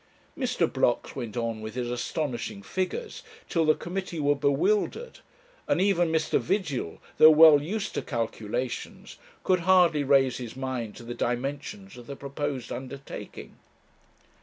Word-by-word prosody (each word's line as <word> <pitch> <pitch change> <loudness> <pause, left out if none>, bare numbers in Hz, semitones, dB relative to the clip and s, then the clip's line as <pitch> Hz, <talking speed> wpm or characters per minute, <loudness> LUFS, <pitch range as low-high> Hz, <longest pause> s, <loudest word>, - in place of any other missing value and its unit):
Mr. 250 -9 0
Blocks 130 -5 0
went 120 -4 -5
on 115 -2 -2
with 110 +2 -7
his 120 -1 -2
astonishing 130 - -3
figures 305 - -3 0.3
till 165 -2 +1
the 155 - +4
committee 180 -1 -5
were 145 0 +2
bewildered, 190 - 0 0.5
and - - +2
even 180 -4 +2
Mr. 160 0 +1
Vigil, 155 - -2 0.2
though 155 - +10
well 155 -2 +8
used 200 +7 -3
to - - -2
calculations, 115 0 -4 0.3
could 185 -1 +3
hardly 175 -4 +4
raise 135 -2 +3
his 120 -2 -7
mind 130 -5 -4
to - - -11
the 120 +1 -6
dimensions 120 -5 -4
of 120 -1 -12
the 140 - -6
proposed 140 -2 -4
undertaking. 135 +2 -8
140 Hz, 140 wpm, -27 LUFS, 120-170 Hz, 0.5 s, though